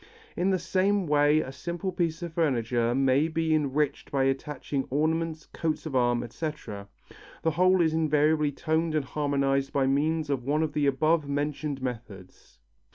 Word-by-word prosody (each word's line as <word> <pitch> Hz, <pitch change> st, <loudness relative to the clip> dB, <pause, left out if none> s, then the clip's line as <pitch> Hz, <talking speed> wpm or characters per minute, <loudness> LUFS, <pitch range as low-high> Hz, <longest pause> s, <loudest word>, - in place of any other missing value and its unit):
In 185 Hz, -, +1 dB
the 190 Hz, -, +2 dB
same 190 Hz, +3 st, +1 dB
way 150 Hz, 0 st, +3 dB
a 130 Hz, -, -6 dB
simple 170 Hz, +7 st, -4 dB
piece 170 Hz, -2 st, -2 dB
of 170 Hz, -2 st, -6 dB
furniture 120 Hz, -6 st, +1 dB
may 135 Hz, +3 st, +3 dB
be 160 Hz, 0 st, 0 dB
enriched 150 Hz, -1 st, 0 dB
by 135 Hz, -1 st, +1 dB
attaching 135 Hz, 0 st, -2 dB
ornaments, 160 Hz, +3 st, -1 dB
coats 160 Hz, -1 st, -2 dB
of 150 Hz, -4 st, -4 dB
arms, 120 Hz, -1 st, +2 dB
etc. 120 Hz, -6 st, -6 dB, 0.6 s
The 160 Hz, -, +2 dB
whole 185 Hz, +3 st, +3 dB
is 160 Hz, -2 st, +2 dB
invariably 150 Hz, -1 st, +2 dB
toned 160 Hz, +2 st, -1 dB
and 150 Hz, -3 st, 0 dB
harmonized 140 Hz, -1 st, 0 dB
by 135 Hz, -1 st, +1 dB
means 150 Hz, +3 st, 0 dB
of 135 Hz, -3 st, -1 dB
one 150 Hz, +4 st, +1 dB
of 155 Hz, -2 st, -2 dB
the 145 Hz, -1 st, +1 dB
above 155 Hz, +2 st, +2 dB
mentioned 145 Hz, -1 st, -2 dB
methods. 110 Hz, -, -8 dB
150 Hz, 160 wpm, -27 LUFS, 135-160 Hz, 0.6 s, way